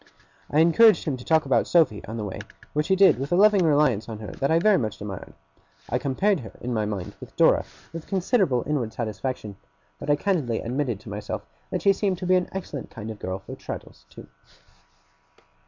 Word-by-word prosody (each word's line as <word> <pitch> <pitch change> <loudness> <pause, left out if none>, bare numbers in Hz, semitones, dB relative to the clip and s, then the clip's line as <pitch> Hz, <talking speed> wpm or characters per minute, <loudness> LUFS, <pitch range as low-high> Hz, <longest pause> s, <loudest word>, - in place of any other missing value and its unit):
I 150 - +3
encouraged 180 +4 +5
him 150 -5 -1
to 125 - -10
talk 160 +1 +2
about 125 -4 +2
Sophy, 150 -12 +3
on 110 +2 -6
the 110 - -3
way; 100 - -5 0.3
which 150 +1 0
he 190 - +3
did 190 -9 +5
with 140 +4 -4
a - - +4
loving 205 0 +5
reliance 145 -9 +2
on 110 - -5
her 105 -1 -7
that 140 - -2
I 160 - +4
very 195 +2 +4
much 110 -3 -3
admired. 100 -2 -7 0.5
I 125 - 0
compared 175 +9 +1
her 115 - -10
in 125 0 -4
my 110 -2 0
mind 100 -4 -4
with - - -12
Dora, - - +4 0.3
with 165 -1 -7
considerable 190 - +1
inward 130 -7 -2
satisfaction; 110 -2 -4 0.4
but 140 - -6
I 145 - +5
candidly 145 - 0
admitted 125 -3 -2
to - - -11
myself 105 0 -5 0.2
that - - -3
she 200 - +5
seemed 190 -1 -1
to 180 - -6
be 185 - +3
an 180 -1 +2
excellent 165 -8 -6
kind 110 0 -7
of 105 - -10
girl 95 +1 -3
for - - -8
Traddles, - - -9
too. - - -12
140 Hz, 210 wpm, -25 LUFS, 110-180 Hz, 0.5 s, encouraged